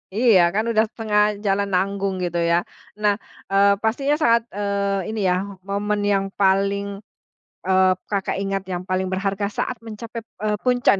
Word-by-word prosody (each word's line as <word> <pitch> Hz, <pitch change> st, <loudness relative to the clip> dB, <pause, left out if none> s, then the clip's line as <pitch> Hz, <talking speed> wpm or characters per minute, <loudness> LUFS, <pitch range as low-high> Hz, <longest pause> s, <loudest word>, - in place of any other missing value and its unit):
Iya, 225 Hz, -3 st, +5 dB, 0.2 s
kan 215 Hz, -, +2 dB
udah 220 Hz, 0 st, +3 dB
setengah 215 Hz, -2 st, +1 dB, 0.2 s
jalan 200 Hz, 0 st, +1 dB
nanggung 195 Hz, +1 st, 0 dB
gitu 175 Hz, -1 st, -1 dB
ya. -, -, +5 dB, 0.5 s
Nah, 205 Hz, -1 st, +5 dB, 0.4 s
eee, 200 Hz, +1 st, +5 dB
pastinya 275 Hz, +6 st, +1 dB
saat, 235 Hz, 0 st, +5 dB, 0.2 s
eee, 200 Hz, -1 st, -1 dB
ini 220 Hz, -, -3 dB
ya -, -, +3 dB, 0.3 s
momen 205 Hz, +1 st, -1 dB
yang 195 Hz, 0 st, +1 dB
paling, 200 Hz, +1 st, +2 dB, 0.8 s
eee, 190 Hz, 0 st, +4 dB, 0.2 s
Kakak 200 Hz, -2 st, -1 dB
ingat, 195 Hz, 0 st, -1 dB
yang 180 Hz, 0 st, -3 dB
paling 185 Hz, 0 st, 0 dB
berharga 195 Hz, +1 st, -1 dB
saat 250 Hz, -, -1 dB
mencapai, 230 Hz, +1 st, -7 dB, 0.2 s
eee, 210 Hz, 0 st, +1 dB
puncak. 245 Hz, -4 st, +3 dB
200 Hz, 155 wpm, -22 LUFS, 195-215 Hz, 0.8 s, Iya